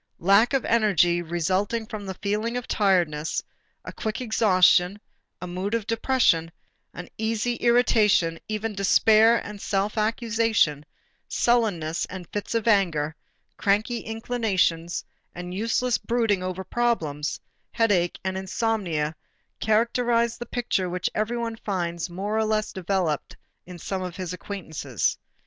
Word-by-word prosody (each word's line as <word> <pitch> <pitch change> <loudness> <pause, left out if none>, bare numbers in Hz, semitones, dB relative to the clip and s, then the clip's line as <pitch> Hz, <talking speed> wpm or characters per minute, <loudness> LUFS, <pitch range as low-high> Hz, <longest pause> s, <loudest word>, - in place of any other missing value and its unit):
Lack 200 +8 +4
of 270 -3 +1
energy 185 -6 +3
resulting 185 +7 -1
from 205 -2 -7
a 190 - -4
feeling 215 +5 -2
of 245 - -5
tiredness, 175 -7 +1 0.4
a - - -7
quick 220 0 -3
exhaustion, 195 -5 +3 0.4
a - - -6
mood 185 +5 -3
of 225 -3 -2
depression, 220 -8 +2 0.4
an 180 - -8
easy 225 +2 0
irritation, 215 -8 +3
even 215 +1 -2
despair 220 +3 +5
and 205 -1 -8
self 205 +2 -1
accusation, 220 - +1 0.4
sullenness 200 -10 +1
and 185 -2 -8
fits 205 +2 -4
of 230 0 0
anger, 165 -8 +2 0.4
cranky 215 +4 +1
inclinations 215 -7 -1 0.3
and 180 0 -6
useless 230 +4 0
brooding 225 -5 0
over 185 +1 -4
problems, 170 -10 -1 0.3
headache 195 -7 +1
and 190 0 -2
insomnia 185 -6 -1 0.4
characterize 235 +1 +2
the 240 - -8
picture 210 -7 -1
which 180 +1 -2
everyone 230 +1 -2
finds 175 -5 -3
more 195 +5 -3
or 220 0 +2
less 215 0 0
developed 180 -5 -2 0.3
in 180 -1 -9
some 190 +3 -4
of 180 -2 -5
his 185 -2 -5
acquaintances. 160 - -3
200 Hz, 125 wpm, -25 LUFS, 175-225 Hz, 0.4 s, despair